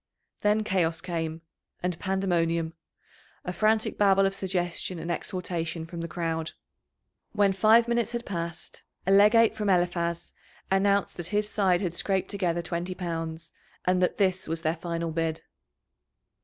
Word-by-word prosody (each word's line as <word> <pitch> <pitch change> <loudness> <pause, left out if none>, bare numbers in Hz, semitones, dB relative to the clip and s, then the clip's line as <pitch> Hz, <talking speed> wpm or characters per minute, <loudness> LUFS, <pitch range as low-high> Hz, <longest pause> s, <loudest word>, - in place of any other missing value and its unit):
Then 210 +1 +3
chaos 170 -5 +1
came, 165 -2 -4 0.4
and 180 -2 -1
pandemonium 170 -4 0 0.7
a 180 - -3
frantic 215 +2 +1
babel 195 -1 +5
of 195 - +1
suggestion 185 -2 -2
and 165 +1 -4
exhortation 170 -2 -3
from 170 0 -7
the 170 - -3
crowd. 165 -1 -3 0.8
When 205 -2 +3
five 220 +5 +5
minutes 235 -1 0
had 235 0 -3
passed, 170 -3 -5 0.2
a 190 - +2
legate 210 +3 +6
from 210 -1 -1
Eliphaz 175 -2 0 0.4
announced 200 +1 +2
that 175 -2 -3
his 210 +1 0
side 185 -5 +2
had 180 -4 -1
scraped 190 +1 -1
together 175 -4 -1
twenty 175 +2 -3
pounds, 165 -2 -4 0.3
and 180 0 +2
that 180 - +1
this 185 -2 +1
was 165 +1 -3
their 160 0 +1
final 170 0 -3
bid. 160 0 -2
180 Hz, 145 wpm, -27 LUFS, 165-195 Hz, 0.8 s, legate